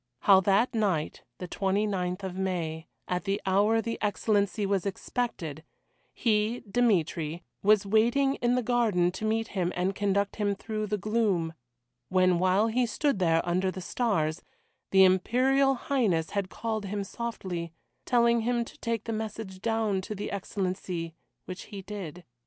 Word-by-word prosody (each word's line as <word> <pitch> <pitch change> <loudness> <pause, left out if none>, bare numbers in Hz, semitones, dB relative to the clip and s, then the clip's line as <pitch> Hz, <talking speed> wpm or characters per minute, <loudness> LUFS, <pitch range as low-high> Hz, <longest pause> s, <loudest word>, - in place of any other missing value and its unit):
How 195 -2 +7
that 200 +7 +2
night, 195 -9 0 0.2
the 180 - -6
29th 195 -1 -1
of 185 -1 -4
May, 170 -4 -2 0.2
at 180 +1 -2
the 200 +1 0
hour 205 +4 +3
the 230 - -3
Excellency 205 0 +1
was 195 -2 +1
expected, 190 - -3 0.5
he 220 +1 +1
Dmitry 175 -7 +1 0.2
was 210 0 +4
waiting 235 +7 +3
in 240 +1 +1
the 250 - +1
garden 215 -7 +2
to 185 +4 -5
meet 225 +1 0
him 180 -3 -1
and 185 +2 0
conduct 200 0 0
him 205 -2 0
through 215 +1 -4
the 210 +1 -1
gloom, 200 -6 0 0.6
when, 185 -2 +3
while 185 +3 +3
he 240 +2 +1
stood 275 0 0
there 165 -2 +2
under 185 +2 +1
the 185 - -5
stars, 180 - -1 0.5
the 190 0 +6
Imperial 255 +9 +3
Highness 230 - 0
had 200 -2 -2
called 220 -1 -3
him 200 +1 -3
softly, 190 -6 -5 0.3
telling 235 -1 +3
him 240 +1 0
to - - -14
take 230 -2 -2
the 230 - -3
message 215 -3 -5
down 225 -4 0
to 210 +3 -6
the 205 - -5
Excellency, 185 -4 -3 0.3
which 185 0 -7
he 200 -2 -8
did. 180 -4 -7
200 Hz, 155 wpm, -28 LUFS, 185-225 Hz, 0.6 s, How